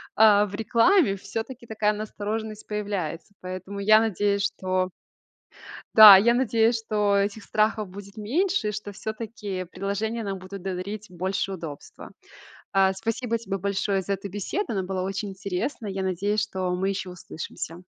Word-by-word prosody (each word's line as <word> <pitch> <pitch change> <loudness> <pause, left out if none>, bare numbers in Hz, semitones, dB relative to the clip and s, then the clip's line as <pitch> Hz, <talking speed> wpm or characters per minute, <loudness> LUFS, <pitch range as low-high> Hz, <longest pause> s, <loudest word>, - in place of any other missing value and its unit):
а, 210 -1 +6
в 200 0 -7
рекламе, 230 - +3
всё-таки 225 +5 -6
такая 215 -1 +1
настороженность 215 0 -5
появляется. 200 -4 -4
Поэтому 185 +2 -6
я 215 +2 +6
надеюсь, 205 -2 +1
что 185 -2 -1 1.1
Да, 210 -3 +12
я 235 +4 +4
надеюсь, 230 -2 +2
что 210 -2 +1
этих 200 +1 0
страхов 215 -1 +1
будет 200 +2 -11
меньше, 295 - 0
и - - -2
что 205 0 -5
всё-таки 215 -3 -5
приложения 200 +5 -3
нам 195 -1 -3
будут 185 +1 -9
да 190 0 -3
дарить 200 +4 -6
больше 190 +2 -2
удобства. 160 -5 -9 0.6
А, 190 0 +4
спасибо 230 +3 -2
тебе 195 -3 -4
большое 195 0 -1
за 200 - -3
эту 195 +1 -4
беседу. 205 - -3
Она 190 - 0
была 185 0 -3
очень 195 +1 -3
интересная. 200 +3 -4
Я 190 0 -3
надеюсь, 200 +3 0
что 190 -4 -3
мы 190 +2 0
ещё 190 -2 -4
услышимся. 170 0 -7
200 Hz, 155 wpm, -25 LUFS, 190-220 Hz, 1.1 s, Да